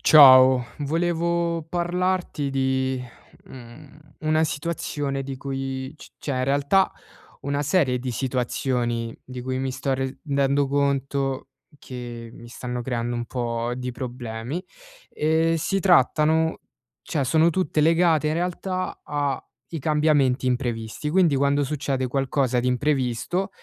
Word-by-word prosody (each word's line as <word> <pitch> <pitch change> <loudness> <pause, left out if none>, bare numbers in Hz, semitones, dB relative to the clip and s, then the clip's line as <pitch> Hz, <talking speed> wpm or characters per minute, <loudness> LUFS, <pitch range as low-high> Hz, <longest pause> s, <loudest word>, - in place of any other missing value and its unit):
Ciao, 130 -4 +8
volevo 170 +2 0
parlarti 175 -3 -1
di, 130 -1 0 0.4
mhmm, 130 +4 -13 0.2
una 155 0 +2
situazione 145 -3 -3
di 135 0 -6
cui, 135 +1 -4
c - - -13
cioè 145 - -4
in 130 - +1
realtà, 140 +8 +2 0.5
una 140 +1 -1
serie 145 -4 +2
di 125 0 -3
situazioni 120 -1 -1
di 130 -1 -8
cui 130 +1 -3
mi 135 0 -2
sto 135 +1 -2
rendendo 140 +1 0
conto 140 -1 -1 0.3
che 120 -3 -8
mi 120 - -12
stanno 125 +1 -5
creando 120 -1 -2
un 120 0 -3
po' 120 -1 -2
di 125 0 -4
problemi. 120 +5 -5 0.5
Ehm, 160 +2 +1
si 195 +5 0
trattano 160 -2 +3 0.5
cioè, 150 -5 0
sono 160 +5 +4
tutte 155 -3 0
legate 165 -1 +3
in 155 - +1
realtà 180 +2 -3
ai 145 +2 -4
cambiamenti 145 -4 +2
imprevisti. 120 +1 -2
Quindi, 170 -3 +3
quando 140 +1 +2
succede 135 -2 -2
qualcosa 130 -1 0
di 125 - -1
imprevisto, 130 +6 0
140 Hz, 125 wpm, -24 LUFS, 125-155 Hz, 0.5 s, Ciao